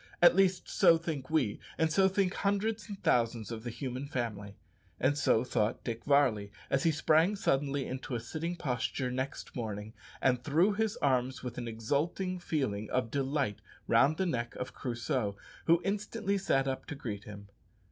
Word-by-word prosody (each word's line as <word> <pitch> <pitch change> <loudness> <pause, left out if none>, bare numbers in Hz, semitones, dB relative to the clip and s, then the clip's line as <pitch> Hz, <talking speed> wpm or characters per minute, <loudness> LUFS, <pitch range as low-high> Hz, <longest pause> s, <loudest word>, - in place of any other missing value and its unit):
At 175 0 +7
least 190 -1 +3
so 170 -5 +5
think 160 -5 -4
we, 140 -10 +1 0.2
and 160 -1 +2
so 190 +2 +5
think 190 -1 +1
hundreds 205 +1 -1
and 200 -1 -6
thousands 115 -2 +1
of 110 -1 -5
the 120 - -4
human 130 +2 -5
family. 105 -6 -4 0.4
And 145 +2 +3
so 120 -5 +3
thought 110 -3 0
Dick 115 -1 -4
Varley, 125 -8 +3 0.2
as 135 - +3
he 165 - +3
sprang 160 +5 +3
suddenly 140 -6 0
into 130 0 -4
a - - -1
sitting 160 +9 -4
posture 125 -3 -2
next 130 +2 -4
morning, 110 -2 -4 0.3
and 125 -2 +2
threw 170 +9 +3
his 215 0 0
arms 130 -2 +1
with 125 -1 -5
an 120 - -4
exulting 145 - -1
feeling 120 -12 -2
of 125 -3 0
delight 135 -5 -1 0.3
round 135 +7 +4
the 190 - +1
neck 120 -8 -2
of 125 - -5
Crusoe, 120 -4 -2 0.3
who 165 +1 +5
instantly 200 0 -1
sat 135 -8 +1
up 135 0 -3
to - - -5
greet 110 -8 -5
him. 100 -1 -10
135 Hz, 175 wpm, -31 LUFS, 120-170 Hz, 0.4 s, At